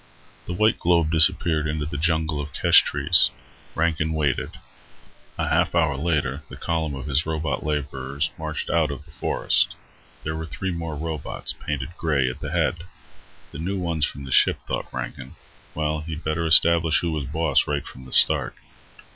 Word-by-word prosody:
The 90 - -3
white 110 +5 +2
globe 85 -2 +2
disappeared 80 -1 +4
into 75 -1 -2
the 75 - -6
jungle 80 -1 0
of 75 0 -8
kesh - - +6
trees. - - +3 0.5
Rankin 80 -1 0
waited. 75 -4 -1 0.8
A - - -1
half - - +1
hour 80 -5 +2
later 75 -2 -1
the - - -9
column 80 -3 -2
of 65 0 -7
his 75 +2 0
robot 80 0 -2
laborers 70 -1 -2
marched 80 -1 -4
out 80 -3 +2
of 70 +1 -7
the 80 - -17
forest. - - +1 0.5
There 80 +1 -3
were 80 0 -5
three 95 +7 -4
more 85 -2 -5
robots, 80 0 -4
painted 75 +3 -5
grey, 75 -6 +1
at 65 - -11
the 75 - -5
head. 85 0 -1 0.7
The 70 - -9
new 95 +5 -3
ones 85 -4 -2
from 70 - -8
the 65 - -8
ship, - - +4
thought - - -4
Rankin. 65 +1 -7 0.4
Well, 75 0 -1
he'd 80 0 -7
better 80 +2 -1
establish 80 0 +5
who 85 - -1
was 75 -3 -3
boss 75 0 +1
right 70 -1 -2
from 65 0 -11
the 65 - -13
start. - - +4
80 Hz, 175 wpm, -23 LUFS, 75-80 Hz, 0.8 s, kesh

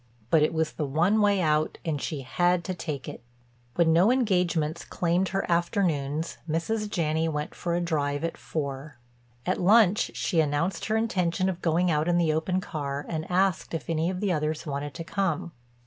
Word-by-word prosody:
But 160 - +5
it 150 - +3
was 160 -1 0
the 150 - -3
one 175 +10 +2
way 205 -2 +3
out 155 -1 +1
and 150 -4 -1
she 150 -4 -3
had 175 +6 +1
to 185 - -3
take 150 -7 -5
it. - - -7 0.5
When 165 -2 +4
no 180 +8 +5
engagements 180 -9 +1
claimed 175 +2 0
her 195 +1 -1
afternoons 165 -3 0
Mrs. 210 +7 -1
Janney 160 -3 0
went 150 0 -3
for 170 -1 -2
a 175 - 0
drive 145 -3 -1
at 165 - -2
four. 140 -2 -5 0.5
At 185 - 0
lunch 210 +2 +5
she 170 - 0
announced 160 +4 0
her 220 0 +1
intention 185 -5 0
of 180 -1 -4
going 170 +1 +2
out 150 +1 +1
in 175 0 +3
the 165 -3 +2
open 180 +4 0
car 145 -5 -4
and 160 -1 -4
asked 185 -2 +1
if 165 - -4
any 165 +1 +1
of 185 0 -4
the 205 -3 +1
others 155 0 -1
wanted 145 -1 -4
to 165 - -5
come. 180 -2 -1
170 Hz, 190 wpm, -27 LUFS, 155-185 Hz, 0.5 s, But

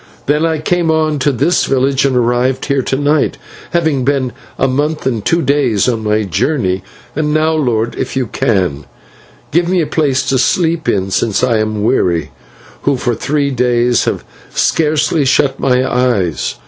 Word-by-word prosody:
"Then 150 +3 +1
I 160 -1 0
came 170 +2 0
on 155 -2 +1
to 145 +2 +2
this 155 +8 +1
village, 135 +1 +1
and 135 -2 +1
arrived 125 +2 +1
here 140 -1 +1
to 130 - -2
night, 145 +2 +1 0.3
having 160 -6 0
been 135 -2 0 0.3
a 135 - +2
month 150 +4 -1
and 115 -6 -1
two 170 0 +1
days 130 -7 +1
on 115 -3 -1
my 105 0 +1
journey. 95 - -1 0.3
And 150 0 0
now, 155 +1 +2
lord, 120 -7 0
if - - -3
you 130 -1 0
can, 90 -11 -1 0.7
give 170 +2 +1
me 185 0 +2
a 165 - +1
place 140 -4 0
to 130 - +2
sleep 165 +3 +1
in, 95 -1 -1
since 110 +3 0
I 120 -3 +2
am 110 -1 -2
weary, 85 - +1 0.5
who 140 -2 +1
for 120 0 -1
three 140 +4 -1
days 120 -1 +1
have - - -2 0.3
scarcely 150 -1 +1
shut 135 +1 +1
my 130 -1 +2
eyes. 120 - 0
130 Hz, 175 wpm, -14 LUFS, 115-150 Hz, 0.7 s, to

